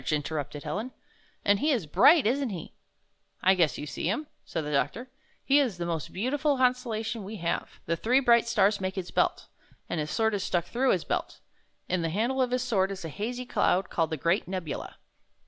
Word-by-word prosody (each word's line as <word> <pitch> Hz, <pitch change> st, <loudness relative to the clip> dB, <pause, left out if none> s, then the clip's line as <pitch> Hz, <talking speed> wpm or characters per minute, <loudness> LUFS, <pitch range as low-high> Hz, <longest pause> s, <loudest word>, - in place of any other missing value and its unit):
interrupted 145 Hz, -1 st, -3 dB
Helen. 210 Hz, +12 st, -4 dB, 0.5 s
"And 200 Hz, 0 st, +4 dB
he 300 Hz, -, +1 dB
is 240 Hz, -, +1 dB
bright, 290 Hz, -, +6 dB
isn't 265 Hz, +3 st, +1 dB
he?" 180 Hz, -6 st, -7 dB, 0.7 s
"I 190 Hz, -, +6 dB
guess 170 Hz, -5 st, +2 dB
you -, -, -5 dB
see 150 Hz, -, -3 dB
him," 265 Hz, +10 st, -1 dB, 0.2 s
said 160 Hz, -2 st, -4 dB
the 150 Hz, -, -4 dB
doctor. 235 Hz, -, -1 dB, 0.3 s
"He 280 Hz, +1 st, +5 dB
is 245 Hz, -10 st, 0 dB
the 175 Hz, -, -3 dB
most 165 Hz, -3 st, -3 dB
beautiful 275 Hz, +7 st, 0 dB
constellation 240 Hz, -4 st, 0 dB
we 200 Hz, +3 st, -7 dB
16 170 Hz, -5 st, -4 dB
have. -, -, -5 dB
The 165 Hz, -, 0 dB
three 245 Hz, +10 st, +3 dB
bright 235 Hz, -3 st, +4 dB
stars 205 Hz, -3 st, +2 dB
make 190 Hz, 0 st, -2 dB
his 185 Hz, -2 st, -5 dB
belt, -, -, +1 dB, 0.4 s
and 170 Hz, -, -2 dB
his 150 Hz, 0 st, -2 dB
sword 220 Hz, +3 st, +1 dB
is 200 Hz, -, -1 dB
stuck 175 Hz, -4 st, 0 dB
through 255 Hz, +6 st, +1 dB
his 180 Hz, -, -1 dB
belt. -, -, -3 dB, 0.5 s
In 185 Hz, -1 st, 0 dB
the 165 Hz, -, -1 dB
handle 235 Hz, +9 st, 0 dB
of 255 Hz, -, +2 dB
his 250 Hz, 0 st, 0 dB
sword 195 Hz, -6 st, +1 dB
is 195 Hz, -3 st, -6 dB
a -, -, -4 dB
hazy 240 Hz, -, -4 dB
cloud 190 Hz, -5 st, +1 dB
called 165 Hz, -2 st, +1 dB
the 160 Hz, -, -3 dB
Great 170 Hz, +4 st, +1 dB
Nebula. 185 Hz, -4 st, -5 dB
200 Hz, 210 wpm, -28 LUFS, 170-250 Hz, 0.7 s, bright